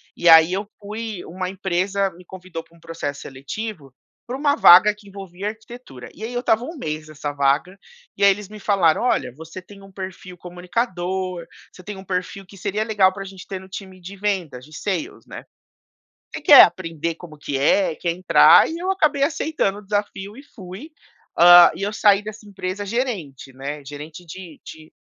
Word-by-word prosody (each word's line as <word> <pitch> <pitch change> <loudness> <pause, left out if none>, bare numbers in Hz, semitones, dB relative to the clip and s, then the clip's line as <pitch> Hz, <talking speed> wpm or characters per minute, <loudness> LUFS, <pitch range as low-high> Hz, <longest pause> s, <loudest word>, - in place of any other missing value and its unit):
e 175 - -1
aí 160 +1 +8
eu 200 +2 -3
fui 215 -1 -6
uma 185 +2 -5
empresa 195 +1 -1
me 180 +1 -16
convidou 180 -2 -9
pra 170 - -25
um - - -21
processo 165 -4 -6
seletivo 140 - -7 0.3
pra 245 - -5
uma 285 +1 +1
vaga 195 - +8
que 205 -1 -19
envolvia 195 -1 -8
arquitetura. 220 - -11
E - - -16
aí 235 - -5
eu 245 - -2
estava 230 -1 +1
um 330 - -8
mês 155 - -5
nessa 150 -1 -5
vaga, 145 +6 0 0.4
e - - -1
aí 200 - +7
eles 200 0 -5
me 215 - -11
falaram: 195 -4 +2
"Olha, 250 - 0
você 160 +3 -10
tem 200 +2 -16
um 195 - -15
perfil 185 -1 -9
comunicador, 180 0 -4 0.3
você 185 - -15
tem 210 +2 -7
um 190 - -10
perfil 185 +1 -4
que 195 +2 -16
seria 205 +3 -2
legal 205 -4 +2
pra 200 - -8
a - - -6
gente 190 -1 -11
ter 190 - -5
no 190 0 -15
time 190 -1 -10
de 190 +3 -10
vendas 185 -11 -3
de 155 +1 -14
sales, 300 - -4
né? - - -9 0.9
Você - - -7
quer 290 -2 +9
aprender 165 -2 -1
como 165 -3 -13
que 145 -1 -4
é, 165 +7 +2
e - - -11
quer 170 -1 -2
entrar?" 180 +2 +6
E 330 - -5
eu 365 +2 -4
acabei 310 -7 +1
aceitando 295 -10 -1
o - - -12
desafio 205 +1 -4
e 275 - -11
fui, 200 - -11 0.4
ah, 175 0 +8
e 180 - -8
eu 205 +1 -2
saí 205 -1 +3
dessa 215 0 -10
empresa 195 0 -5
gerente, 195 - -4
né, 140 +2 -7
gerente 150 +5 -10
de 170 -1 -11
de, 155 0 -12
190 Hz, 200 wpm, -21 LUFS, 170-210 Hz, 0.9 s, quer